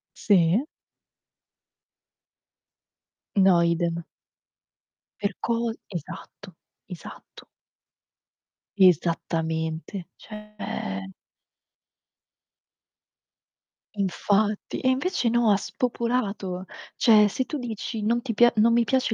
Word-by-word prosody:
Sì. 190 Hz, -, +3 dB, 2.7 s
No, 190 Hz, -3 st, +5 dB
idem. 170 Hz, 0 st, 0 dB, 1.2 s
Per 200 Hz, -1 st, -2 dB
co 235 Hz, 0 st, -1 dB, 0.2 s
esatto. 180 Hz, +1 st, -9 dB, 0.3 s
Esatto. 180 Hz, -4 st, -11 dB, 1.3 s
Esattamente, 165 Hz, -1 st, +1 dB
cioè 210 Hz, -, -6 dB, 2.8 s
Infatti. 205 Hz, +2 st, 0 dB
E 260 Hz, -, +1 dB
invece 260 Hz, -2 st, 0 dB
no, 235 Hz, -2 st, +3 dB
ha 200 Hz, -, +4 dB
spopolato. 220 Hz, -7 st, -2 dB, 0.3 s
Cioè 215 Hz, -3 st, +6 dB
se 255 Hz, +5 st, -2 dB
tu 300 Hz, -, -4 dB
dici: 225 Hz, -1 st, -5 dB
"Non 235 Hz, +3 st, +1 dB
ti 235 Hz, -4 st, -3 dB
pia 240 Hz, +3 st, +5 dB
non 230 Hz, +2 st, +4 dB
mi 235 Hz, 0 st, +4 dB
piace 260 Hz, -3 st, +1 dB
205 Hz, 80 wpm, -25 LUFS, 175-235 Hz, 2.8 s, Cioè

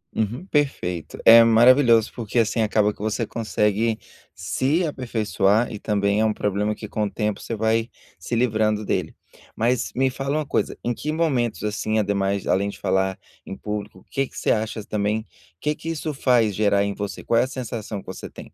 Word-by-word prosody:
Uhum, 115 Hz, -, -2 dB
perfeito, 130 Hz, -, -1 dB
é 115 Hz, 0 st, +10 dB
maravilhoso, 115 Hz, 0 st, +5 dB
porque, 120 Hz, -1 st, -5 dB
assim, 115 Hz, 0 st, +2 dB
acaba 105 Hz, -1 st, +2 dB
que -, -, -26 dB
você 110 Hz, +2 st, -1 dB
consegue 110 Hz, 0 st, 0 dB, 0.4 s
se 135 Hz, -, 0 dB
aperfeiçoar 110 Hz, -, 0 dB
e 105 Hz, -, -6 dB
também 100 Hz, 0 st, +1 dB
é -, -, +3 dB
um 110 Hz, -, +1 dB
problema 105 Hz, +1 st, -1 dB
que, 105 Hz, -, -8 dB
com 105 Hz, 0 st, -1 dB
o -, -, -2 dB
tempo, 105 Hz, -2 st, -2 dB
você 115 Hz, -, -4 dB
vai 110 Hz, +2 st, +1 dB, 0.3 s
se 120 Hz, -, -3 dB
livrando 110 Hz, -3 st, +1 dB
dele. 90 Hz, -4 st, -2 dB, 0.4 s
Mas 120 Hz, +2 st, 0 dB
me 130 Hz, +1 st, +2 dB
fala 135 Hz, +3 st, -2 dB
uma 155 Hz, -, -1 dB
coisa, -, -, -1 dB
em 120 Hz, -, 0 dB
que 150 Hz, +6 st, -4 dB
momentos, 135 Hz, -10 st, 0 dB
assim, 105 Hz, +1 st, -1 dB
ademais 100 Hz, -2 st, 0 dB
além 100 Hz, +2 st, +1 dB
de -, -, -9 dB
falar 95 Hz, 0 st, 0 dB, 0.3 s
em 95 Hz, -, -7 dB
público, 105 Hz, -3 st, -6 dB
que 135 Hz, -2 st, 0 dB
que -, -, -15 dB
você -, -, +1 dB
acha 110 Hz, 0 st, -1 dB
também, 105 Hz, +1 st, -1 dB, 0.3 s
que 150 Hz, -, 0 dB
que 165 Hz, -, -7 dB
isso 155 Hz, -1 st, -3 dB
faz 120 Hz, -6 st, +2 dB
gerar 100 Hz, -1 st, +2 dB
em 100 Hz, 0 st, -1 dB
você, 100 Hz, 0 st, -5 dB
qual 115 Hz, -, +2 dB
é -, -, +4 dB
a -, -, -6 dB
sensação 115 Hz, -5 st, -5 dB
que -, -, -14 dB
você -, -, -8 dB
tem? -, -, -12 dB
110 Hz, 195 wpm, -23 LUFS, 105-120 Hz, 0.4 s, é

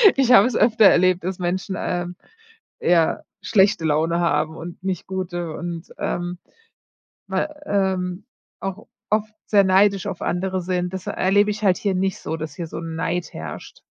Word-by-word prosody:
ich 265 Hz, -2 st, +3 dB
habe 220 Hz, -2 st, +8 dB
es 250 Hz, -, -3 dB
öfter 220 Hz, -1 st, +4 dB
erlebt, 185 Hz, -1 st, +5 dB
dass 185 Hz, +1 st, -3 dB
Menschen, 185 Hz, +2 st, -2 dB
ähm, 175 Hz, 0 st, -3 dB, 0.7 s
ja 170 Hz, -2 st, +3 dB, 0.3 s
schlechte 195 Hz, -5 st, +3 dB
Laune 160 Hz, +2 st, +1 dB
haben 160 Hz, -2 st, +1 dB
und 170 Hz, +2 st, -9 dB
nicht 185 Hz, -2 st, -3 dB
gute 175 Hz, -3 st, -4 dB
und, 170 Hz, 0 st, -6 dB
ähm, 175 Hz, 0 st, -3 dB, 0.9 s
mal, 300 Hz, -1 st, -3 dB
ähm 190 Hz, -3 st, -1 dB, 0.3 s
auch 195 Hz, +2 st, -6 dB, 0.2 s
oft 215 Hz, 0 st, +1 dB
sehr 205 Hz, -2 st, +4 dB
neidisch 195 Hz, +1 st, +3 dB
auf 190 Hz, -4 st, -5 dB
andere 185 Hz, +1 st, -1 dB
sind. 180 Hz, 0 st, -2 dB
Das 190 Hz, -1 st, -5 dB
erlebe 205 Hz, +3 st, +2 dB
ich 210 Hz, +1 st, -6 dB
halt 190 Hz, -3 st, +4 dB
hier 200 Hz, -2 st, -1 dB
nicht 190 Hz, 0 st, 0 dB
so, 160 Hz, -, -4 dB
dass 155 Hz, 0 st, -6 dB
hier 175 Hz, -, -4 dB
so -, -, -7 dB
'n 165 Hz, -1 st, -5 dB
Neid 170 Hz, +2 st, -2 dB
herrscht. -, -, -8 dB
185 Hz, 170 wpm, -22 LUFS, 175-200 Hz, 0.9 s, habe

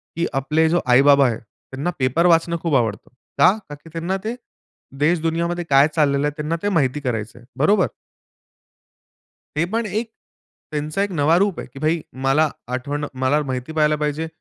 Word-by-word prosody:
की 170 Hz, -, 0 dB
आपले 150 Hz, +4 st, +1 dB
जे 170 Hz, -, +2 dB
आई-बाबा 140 Hz, +2 st, +6 dB
आहेत 115 Hz, -2 st, -2 dB
त्यांना 135 Hz, +7 st, -7 dB
पेपर 130 Hz, +6 st, +2 dB
वाचणं 170 Hz, 0 st, +3 dB
खूप 165 Hz, -4 st, 0 dB
आवडतं. 115 Hz, -5 st, -1 dB, 0.3 s
का? 185 Hz, -, +6 dB, 0.2 s
कारण 145 Hz, -, -6 dB
की 165 Hz, -, -13 dB
त्यांना 170 Hz, +3 st, -2 dB
ते 225 Hz, +2 st, -3 dB, 0.6 s
देश-दुनियाामध्ये 170 Hz, +2 st, 0 dB
काय 140 Hz, +1 st, +6 dB
चाललेलं 145 Hz, -2 st, +2 dB
आहे -, -, -1 dB
त्यांना 150 Hz, +2 st, -2 dB
ते 205 Hz, -, +1 dB
माहिती 150 Hz, -7 st, +1 dB
करायचं 115 Hz, -3 st, -4 dB
आहे. 120 Hz, -, -18 dB
बरोबर. 200 Hz, -2 st, +3 dB, 1.7 s
हे 160 Hz, -, +2 dB
पण 230 Hz, 0 st, 0 dB
एक 220 Hz, +3 st, -3 dB, 0.6 s
त्यांचा 155 Hz, +4 st, -2 dB
एक 200 Hz, -, -1 dB
नवा 160 Hz, 0 st, +3 dB
रूप 200 Hz, -1 st, +1 dB
आहे. -, -, -8 dB
की 135 Hz, -, -10 dB
भाई, 155 Hz, +3 st, 0 dB, 0.2 s
मला 140 Hz, +4 st, +3 dB, 0.3 s
आठवण 145 Hz, +3 st, -3 dB, 0.2 s
मला 140 Hz, +3 st, +3 dB
माहिती 130 Hz, +3 st, -4 dB
पहायला 150 Hz, -1 st, +2 dB
पाहिजे, 150 Hz, +1 st, -2 dB
150 Hz, 170 wpm, -21 LUFS, 135-170 Hz, 1.7 s, आई-बाबा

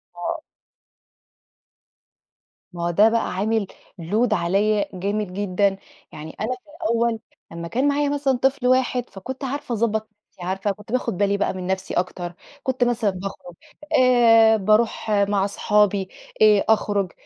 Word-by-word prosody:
آه. 310 Hz, -, -4 dB, 2.3 s
ما 170 Hz, -1 st, -5 dB
هو -, -, 0 dB
ده 210 Hz, +6 st, +5 dB
بقى 230 Hz, 0 st, -1 dB
عامِل 210 Hz, +1 st, 0 dB, 0.3 s
load 215 Hz, +7 st, +1 dB
عليّا 200 Hz, +4 st, +1 dB
جامد 200 Hz, +1 st, -3 dB
جدًا، 200 Hz, 0 st, 0 dB, 0.4 s
يعني 155 Hz, +1 st, -9 dB
أنا 215 Hz, -, -1 dB
في 250 Hz, -, -23 dB, 0.2 s
الأول 230 Hz, 0 st, +1 dB, 0.3 s
لمّا 170 Hz, 0 st, -6 dB
كان 255 Hz, +9 st, 0 dB
معايا 285 Hz, 0 st, +1 dB
مثلًا 280 Hz, -3 st, 0 dB
طفل 260 Hz, -1 st, +1 dB
واحد 255 Hz, -1 st, +1 dB
فكنت 250 Hz, +8 st, -8 dB
عارفة 270 Hz, -2 st, -3 dB
أضبّط 220 Hz, -1 st, 0 dB, 0.2 s
نفْسي، 180 Hz, -, -18 dB
عارفة 195 Hz, +2 st, -1 dB
كنت 210 Hz, +2 st, -11 dB
باخد 250 Hz, -7 st, -1 dB
بالي 200 Hz, 0 st, +1 dB
بقى -, -, 0 dB
من 185 Hz, -1 st, -6 dB
نفْسي 190 Hz, 0 st, -2 dB
أكتر، 175 Hz, -1 st, -3 dB, 0.3 s
كنت 260 Hz, -1 st, 0 dB
مثلًا 235 Hz, -3 st, +1 dB
باخرج 180 Hz, -2 st, -8 dB, 0.5 s
آآ، 225 Hz, -3 st, +6 dB
بارُوح 215 Hz, +2 st, +1 dB
مع 200 Hz, -1 st, +2 dB
أصحابي، 205 Hz, -1 st, +1 dB, 0.3 s
آآ، 210 Hz, -2 st, +5 dB
أخرج، 205 Hz, -4 st, +1 dB
210 Hz, 145 wpm, -22 LUFS, 190-235 Hz, 2.3 s, آآ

